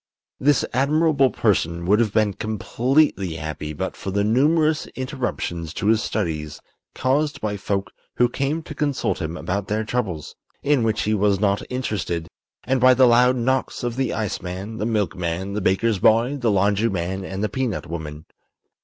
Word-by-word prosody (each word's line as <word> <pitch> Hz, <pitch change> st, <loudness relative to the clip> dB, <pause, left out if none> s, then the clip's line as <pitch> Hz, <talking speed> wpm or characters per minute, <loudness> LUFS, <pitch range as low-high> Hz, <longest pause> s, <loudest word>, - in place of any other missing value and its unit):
This 145 Hz, 0 st, +3 dB
admirable 140 Hz, +1 st, +3 dB
person 85 Hz, -7 st, 0 dB
would 105 Hz, +4 st, +4 dB
have 115 Hz, -3 st, +2 dB
been 105 Hz, -1 st, +2 dB
completely 110 Hz, -, 0 dB
happy 75 Hz, -1 st, -5 dB
but 95 Hz, +5 st, -4 dB
for -, -, -6 dB
the 100 Hz, +1 st, 0 dB
numerous 155 Hz, +8 st, +2 dB
interruptions 120 Hz, -, -4 dB
to -, -, -3 dB
his 110 Hz, +1 st, +4 dB
studies 80 Hz, -10 st, -3 dB, 0.4 s
caused 145 Hz, +3 st, 0 dB
by 105 Hz, -1 st, -2 dB
folk 100 Hz, 0 st, -2 dB, 0.2 s
who 120 Hz, -, +4 dB
came 140 Hz, +6 st, -2 dB
to -, -, -8 dB
consult 145 Hz, -3 st, -1 dB
him 80 Hz, +2 st, -3 dB
about 100 Hz, +2 st, -3 dB
their 110 Hz, +1 st, -1 dB
troubles 105 Hz, -10 st, -3 dB, 0.3 s
(in 145 Hz, -2 st, +3 dB
which 110 Hz, -2 st, 0 dB
he 105 Hz, -, +1 dB
was 100 Hz, -2 st, +2 dB
not 100 Hz, -1 st, +1 dB
interested), 100 Hz, -10 st, -2 dB, 0.4 s
and 130 Hz, 0 st, 0 dB
by 130 Hz, 0 st, +7 dB
the 130 Hz, +1 st, +6 dB
loud 125 Hz, +1 st, +5 dB
knocks 130 Hz, +2 st, -1 dB
of 120 Hz, -1 st, -2 dB
the 130 Hz, -2 st, 0 dB
iceman, 100 Hz, 0 st, -4 dB
the 105 Hz, -, -1 dB
milkman, 95 Hz, -3 st, -2 dB
the 105 Hz, -, -2 dB
baker's 95 Hz, +3 st, +1 dB
boy, 115 Hz, +8 st, +4 dB
the 125 Hz, -5 st, 0 dB
laundryman 100 Hz, -2 st, +1 dB
and 95 Hz, +2 st, -4 dB
the -, -, +2 dB
peanut 115 Hz, -1 st, -2 dB
woman. 80 Hz, -2 st, -6 dB
110 Hz, 165 wpm, -22 LUFS, 95-130 Hz, 0.4 s, by